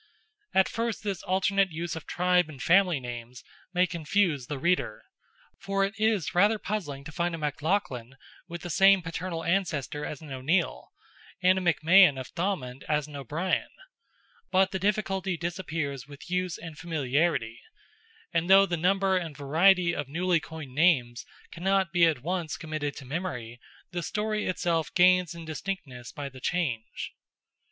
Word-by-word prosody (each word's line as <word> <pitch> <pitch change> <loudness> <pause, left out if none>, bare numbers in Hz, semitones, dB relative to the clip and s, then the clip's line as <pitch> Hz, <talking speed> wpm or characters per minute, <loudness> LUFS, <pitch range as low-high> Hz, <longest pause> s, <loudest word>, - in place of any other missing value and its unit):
At 190 0 +5
first 230 -1 -3
this 200 -4 -3
alternate 195 +1 +2
use 165 0 -4
of 160 - -8
tribe 180 -2 +2
and 145 -4 -10
family 180 +1 +4
names 120 0 -8 0.3
may 180 0 +3
confuse 165 -4 0
the 145 - -4
reader—for 180 - -2
it 200 - -4
is 215 -5 +1
rather 205 +5 +4
puzzling 180 -11 -4
to 160 - -9
find 170 +1 -1
a - - -6
MacLoughlin 145 - -2 0.3
with 170 -1 -7
the 175 - -4
same 195 +2 +5
paternal 165 0 -4
ancestor 155 -6 -1
as 150 - -5
an 155 -3 -11
O'Neill, 155 +7 -1 0.5
and 185 +1 +5
a - - -5
McMahon 175 -3 +5
of 130 - -7
Thomond 165 -8 -3
as 150 -1 +1
an 150 -1 -11
O'Brien, 155 +7 -1 0.8
but 190 +1 +3
the 190 - -2
difficulty 195 -2 0
disappears 160 -6 -4
with 145 +4 -12
use 180 -1 -1
and 160 -3 -9
familiarity, 145 -6 0 0.7
and 165 +2 0
though 195 +1 +8
the 175 -3 -2
number 190 +2 +2
and 165 -6 -5
variety 170 +5 +4
of 145 -3 -3
newly 175 +3 +1
coined 155 -5 -9
names 130 -6 +2 0.2
cannot 190 +1 0
be 175 -1 +6
at 145 -6 -1
once 175 -1 -2
committed 155 -3 -4
to 140 - -9
memory, 125 -6 -5 0.3
the 175 -1 -3
story 215 +3 -2
itself 170 -3 0
gains 180 -1 +4
in 165 -1 -8
distinctness 150 -6 -6
by 145 -1 -6
the 130 -1 -11
change. 135 -10 -2
170 Hz, 155 wpm, -28 LUFS, 145-185 Hz, 0.8 s, though